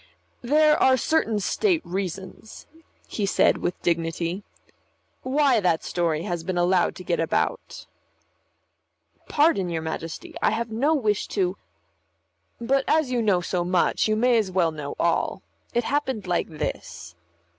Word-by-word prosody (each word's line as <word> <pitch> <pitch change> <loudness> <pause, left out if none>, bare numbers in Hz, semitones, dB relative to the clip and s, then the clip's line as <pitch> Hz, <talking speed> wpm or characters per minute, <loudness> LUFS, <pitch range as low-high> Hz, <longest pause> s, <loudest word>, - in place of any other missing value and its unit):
"There 300 +4 +3
are 260 0 +5
certain 230 -6 +1
state 345 - 0
reasons," 190 +3 -6 0.4
he 205 -2 -2
said - - +3
with 175 - -3
dignity, 170 +2 -1 0.8
"why 265 -2 +2
that 175 -5 +1
story 165 -2 -1
has 175 -4 -3
been 185 +1 -3
allowed 175 0 +2
to 180 - -9
get 175 -1 -1
about." 120 - -2 1.4
"Pardon, 290 - +2
your 165 -2 -3
Majesty. 160 0 -6
I - - +4
have 230 +1 -2
no 280 +8 +2
wish 215 -7 0
to 185 -2 -1 0.5
" 85 +1 -48 0.3
"But 270 +3 +1
as 310 -5 +2
you 245 -2 +1
know 200 -5 +2
so 175 0 -1
much, 180 +3 +1
you 215 - +1
may 240 +1 +3
as 210 -3 -1
well 180 -3 +1
know 150 -2 -6
all. 170 - 0 0.3
It 240 - 0
happened 265 -6 -1
like 175 -1 0
this." 85 - -6
190 Hz, 145 wpm, -24 LUFS, 170-245 Hz, 1.4 s, are